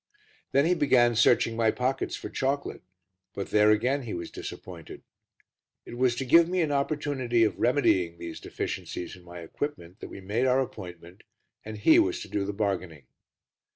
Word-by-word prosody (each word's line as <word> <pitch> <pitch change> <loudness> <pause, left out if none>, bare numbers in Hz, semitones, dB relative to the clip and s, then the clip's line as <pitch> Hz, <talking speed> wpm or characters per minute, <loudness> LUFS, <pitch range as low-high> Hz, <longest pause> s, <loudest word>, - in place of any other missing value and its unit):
Then 140 +2 +3
he 175 - +3
began 125 -7 +3
searching 115 0 +3
my 115 -1 +2
pockets 125 +4 -1
for - - -7
chocolate, 140 +1 -2 0.5
but 100 - -5
there, 105 0 +5
again, 125 +7 +2
he 115 -6 -5
was 85 -1 -6
disappointed. - - -9 0.8
It - - -9
was 125 -1 +2
to 135 - -3
give 165 +6 +6
me 185 0 +1
an 155 -3 0
opportunity 140 -4 0
of 110 - 0
remedying 95 - +2
these 85 -1 -7
deficiencies 90 - -5
in 90 - -17
my 85 0 -10
equipment 90 - -6
that - - -8
we - - -9
made 105 +7 -1
our 130 +1 +3
appointment, 90 -7 -7 0.4
and 110 0 -7
he 115 - +5
was 345 +1 +1
to - - -7
do 100 -1 -2
the 100 - -2
bargaining. 95 -7 -3
120 Hz, 175 wpm, -27 LUFS, 95-140 Hz, 0.8 s, give